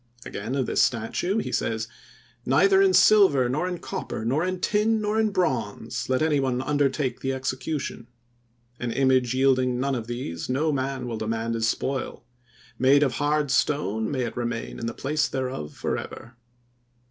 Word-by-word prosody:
Again 115 +6 -4
of 135 -2 0
this - - +1
statue 130 - 0
he 220 - -2
says: 110 0 -1 0.6
"Neither 190 +10 +4
in 195 -1 +5
silver, 185 -11 +5
nor 150 +8 -1
in 180 -1 -3
copper, 110 - -5
nor 135 +8 +1
in 185 0 -2
tin, 215 +3 +2
nor 210 +1 0
in 220 -1 +3
bronze 125 - -2
let 130 +3 +2
any 155 -2 +2
one 130 -2 0
undertake 145 -1 0
the 135 0 -2
execution. 130 -1 -4 0.7
An 120 -1 -2
image 130 -1 +2
yielding 130 -2 +2
none 135 +1 0
of 115 -3 -3
these 120 -9 -5
no 150 +5 +1
man 135 -2 -2
will 115 -2 -4
demand 115 +1 -2
as 115 0 0
spoil; 135 +4 -2 0.6
made 135 +3 +5
of 135 - +1
hard 145 -1 +1
stone 110 -9 +1
may 130 -3 -1
it 115 - -4
remain 120 -1 -4
in 115 - -3
the 115 - -4
place 145 +2 0
thereof, 130 - -4
forever." 120 +1 -5
130 Hz, 170 wpm, -25 LUFS, 120-150 Hz, 0.7 s, in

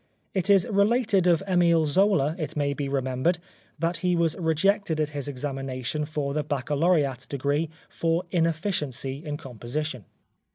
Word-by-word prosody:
It 190 0 -1
is 195 -3 +5
related 205 -2 +3
of 170 0 +4
Emile 170 -3 +4
Zola, 160 -2 +3
it 155 -1 -4
may 140 -1 +1
be 140 -1 -3
remembered, 135 +5 0 0.4
that 165 +1 -1
he 180 0 +1
was 170 -2 +1
rejected 170 +1 +1
at 150 -1 +1
his 145 -2 -4
examination 135 0 -3
for 150 -2 -3
the 150 - 0
baccalaureat 145 0 0
degree 145 +3 0 0.2
for 165 +1 0
inefficiency 160 - -1
in 150 -2 -4
composition. 125 - -5
155 Hz, 140 wpm, -26 LUFS, 140-175 Hz, 0.4 s, is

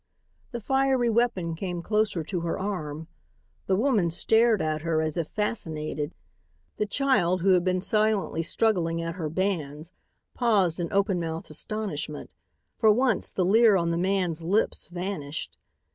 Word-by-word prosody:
The 240 - -5
fiery 265 0 +2
weapon 215 -8 +1
came 175 0 -4
closer 210 -5 0
to 180 +3 -3
her 165 0 -2
arm. 160 -6 -4 0.6
The 190 - +3
woman 215 -5 +2
stared 220 +6 +3
at 155 -1 -1
her 165 0 0
as 155 -1 -1
if 165 -3 -2
fascinated. 155 -8 -3 0.6
The 210 - -1
child, 205 -9 +1
who 195 - +2
had 180 -2 +4
been 185 0 0
silently 215 -4 +1
struggling 170 -2 +1
at 165 0 -3
her 165 -3 -4
bands, 165 -3 -2 0.4
paused 200 -9 +2
in 170 -1 -3
open 195 -2 +1
mouthed 165 -1 -5
astonishment. 155 -5 -4 0.5
For 220 -2 +6
once 245 0 +1
the 185 - 0
leer 220 +2 +5
on 170 -1 0
the - - 0
man's 180 -2 0
lips 200 +6 0
vanished. 175 -4 -5
185 Hz, 150 wpm, -26 LUFS, 165-215 Hz, 0.6 s, For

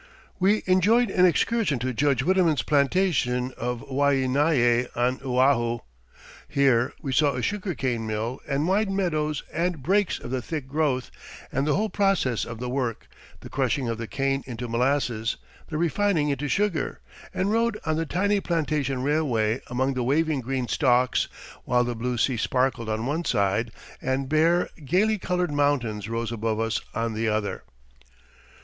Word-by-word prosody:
We 200 +3 +3
enjoyed 200 +5 +3
an 185 -1 +5
excursion 200 - +1
to 125 +2 -2
Judge 135 0 +1
Widemann's 175 -4 +2
plantation 140 -5 +1
of 120 -1 -4
Waianae 135 -2 +2
on 125 +2 +1
Oahu. 125 -2 +2 0.7
Here 130 -3 +2
we 135 -3 -2
saw 145 0 +3
a 125 - -3
sugar 200 -4 -2
cane 120 -4 -2
mill 110 +4 -3
and 145 +2 0
wide 200 +2 +2
meadows 155 -7 -1
and 170 -3 -1
brakes 195 +5 +2
of 120 - -8
the 130 -1 -1
thick 150 +1 -5
growth, 140 -3 -1 0.4
and 135 +3 0
the 150 - +2
whole 215 +1 0
process 195 - +1
of 115 - -7
the 125 - -4
work 125 -3 -3 0.3
the - - -10
crushing 130 -1 0
of 115 -1 -3
the 115 - -4
cane 135 +1 -1
into 125 -1 -5
molasses, 120 -2 0 0.3
the 155 - -3
refining 170 -1 +1
into 140 +1 -1
sugar 190 -3 0 0.3
and 190 +2 -1
rode 230 0 +1
on 160 -1 +1
the 165 +1 -1
tiny 200 +5 +1
plantation 150 -7 -1
railway 130 -6 +1
among 130 +3 0
the 130 - -2
waving 150 +2 +1
green 130 0 -2
stalks, 125 0 +2 0.4
while 125 0 +2
the 120 0 -2
blue 120 +2 -2
sea 125 +1 +1
sparkled 125 -1 0
on 110 +1 -2
one 155 +6 -1
side, 105 - 0 0.3
and 130 +1 -1
bare, 165 +3 +3 0.2
gaily 200 +9 +2
coloured 180 -3 -1
mountains 120 -8 0
rose 115 0 -2
above 110 -1 -2
us 115 0 0
on 115 0 -1
the 110 +1 -1
other. 105 -1 -2
135 Hz, 160 wpm, -25 LUFS, 120-165 Hz, 0.7 s, an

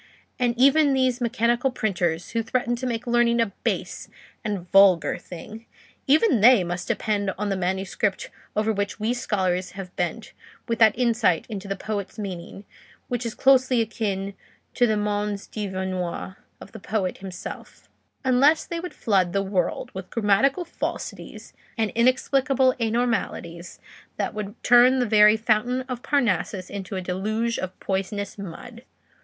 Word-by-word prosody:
And 240 -1 +1
even 275 +2 +5
these 255 -1 +1
mechanical 240 +2 +1
printers 175 -8 -1
who 230 - 0
threaten 240 +1 -1
to 255 - -3
make 235 -1 -3
learning 240 -1 +2
a 225 -4 +1
base - - -3 0.3
and 200 -5 -3
vulgar 190 -6 +5
thing—even 230 - -1
they 240 -3 +7
must 175 +1 -4
depend 205 -2 -1
on 210 +1 -2
the 195 - 0
manuscript 190 +2 -2 0.2
over 215 +1 +1
which 200 +1 -3
we 220 +3 0
scholars 185 -7 -1
have 190 -2 -8
bent 180 +6 -3 0.3
with 230 - -1
that 220 -2 +5
insight 230 -8 +2
into 200 -2 -6
the 195 - -2
poet's 200 0 -5
meaning 195 -1 -7 0.4
which 245 -1 -2
is 225 - -6
closely 260 -2 +4
akin 200 -3 -2 0.4
to 245 - +3
the 215 -1 +1
mens 205 -1 -2
divinior 190 -3 -4 0.2
of - - -12
the 220 - -10
poet 195 -2 -2
himself; 190 -1 -9 0.4
unless 275 +5 +4
they 340 - -4
would 360 +1 -7
flood 190 -5 +1
the 195 0 +1
world 190 -3 -2
with 190 0 -7
grammatical 235 - +2
falsities - - -6 0.2
and 220 -2 0
inexplicable 260 +2 +2
anomalies 220 -7 -2 0.4
that - - -2
would 210 0 -5
turn 245 +2 +6
the 250 - +2
very 210 -1 +6
fountain 230 +3 +1
of 250 -2 -6
Parnassus 205 -9 0
into 200 0 -6
a 185 - -2
deluge 215 +6 -2
of 185 0 -6
poisonous 200 +1 -3
mud. 230 +6 -9
215 Hz, 150 wpm, -24 LUFS, 195-245 Hz, 0.4 s, they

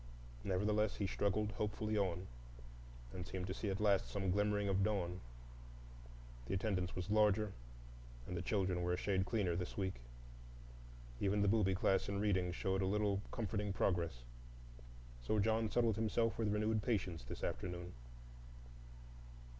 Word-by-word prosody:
Nevertheless, 105 +3 +1
he 100 - -1
struggled 100 +2 0
hopefully 105 0 -2
on, 95 -3 0 0.9
and 90 - -4
seemed 95 -1 -3
to 95 - -3
see 100 +1 -3
at 95 - -2
last 100 -2 +3
some 95 -2 -1
glimmering 105 +1 +2
of 95 0 +2
dawn. 90 -4 0 1.3
The 95 - 0
attendance 95 -3 -1
was 90 +2 -3
larger 105 -1 +3 0.7
and 90 - -5
the 85 - -1
children 95 -3 0
were 90 0 +1
a - - 0
shade 95 0 0
cleaner 100 -7 +1
this 90 0 -4
week. 95 -2 0 1.3
Even 100 +1 +2
the - - +3
booby 100 -3 +3
class 95 +1 +2
in 100 0 -1
reading 95 -4 +2
showed 95 +2 0
a 95 - +1
little 100 0 +1
comforting 105 -3 -2
progress. 85 -11 0 1.0
So 110 - 0
John 110 +1 +2
settled 115 -3 +2
himself 110 +1 +1
with 110 -2 +1
renewed 105 +1 +1
patience 95 - -1
this - - -7
afternoon. 90 0 -3
100 Hz, 145 wpm, -38 LUFS, 90-105 Hz, 1.3 s, last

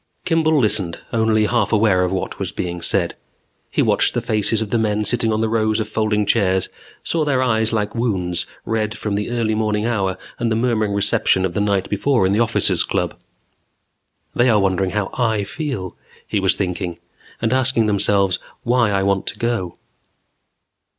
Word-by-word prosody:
Kimball 160 -2 +2
listened, 100 -7 +2 0.2
only 110 -1 +2
half 120 +3 +1
aware 105 -4 +3
of 90 - -1
what 95 - -3
was - - -3
being 85 -1 -4
said. - - 0 0.5
He - - +1
watched - - +2
the - - +2
faces 110 +1 +1
of 110 -2 -4
the 115 - +2
men 105 -1 0
sitting 115 +1 +1
on 110 0 0
the 115 - +1
rows 110 -1 +1
of 110 - -2
folding 105 -1 0
chairs, 95 -3 +1 0.3
saw 165 -2 0
their 135 -3 +1
eyes 110 -3 +1
like 105 -2 -1
wounds, 90 -7 -1 0.2
red 110 0 -2
from 105 -1 -3
the 105 +2 -2
early 115 -2 0
morning 105 0 0
hour 100 -5 -1 0.2
and 120 -1 0
the - - +2
murmuring 110 -3 0
reception 100 -1 +2
of 90 - -3
the 100 - 0
night 100 -2 0
before 110 +1 +1
in 95 - +2
the 105 - +1
Officers' 115 -1 +2
Club. - - -2 1.2
They 120 +1 +3
are 110 -3 +4
wondering 95 -1 +1
how 105 0 -2
I 110 -4 0
feel, 115 - -5 0.3
he 105 - -1
was 95 -1 +3
thinking. 90 -3 -3 0.4
And 115 +1 0
asking 130 -3 +2
themselves 100 -2 +2 0.2
why 120 -2 +2
I 100 -1 +1
want 100 -1 0
to - - -3
go. 115 -7 -2
110 Hz, 185 wpm, -20 LUFS, 100-115 Hz, 1.2 s, are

